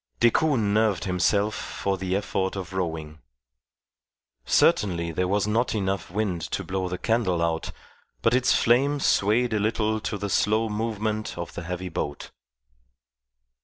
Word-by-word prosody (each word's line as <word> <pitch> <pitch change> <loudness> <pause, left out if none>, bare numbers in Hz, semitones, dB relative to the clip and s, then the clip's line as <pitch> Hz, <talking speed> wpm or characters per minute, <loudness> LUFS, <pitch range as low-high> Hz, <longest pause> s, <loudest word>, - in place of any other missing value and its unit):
Decoud 140 +5 +3
nerved 105 -3 +1
himself 100 +3 +1
for 100 -2 -3
the 95 0 -2
effort 95 -1 -1
of 95 -1 -6
rowing. 80 -4 -4 1.3
Certainly 85 +7 +2
there 90 +3 -1
was 100 +2 +1
not 115 +3 0
enough 95 -2 -2
wind 95 -2 -1
to 80 - -3
blow 95 -1 -2
the 90 - -3
candle 110 -6 +1
out, 85 -1 -1 0.5
but 115 - +3
its 130 0 +3
flame 140 +5 +3
swayed 115 0 +2
a 105 - +1
little 110 +1 0
to 105 - -3
the 100 +1 -3
slow 110 +3 +1
movement 110 -1 -2
of 85 -1 -5
the - - -5
heavy 90 +2 -5
boat. 75 -3 -4
100 Hz, 145 wpm, -25 LUFS, 90-110 Hz, 1.3 s, Decoud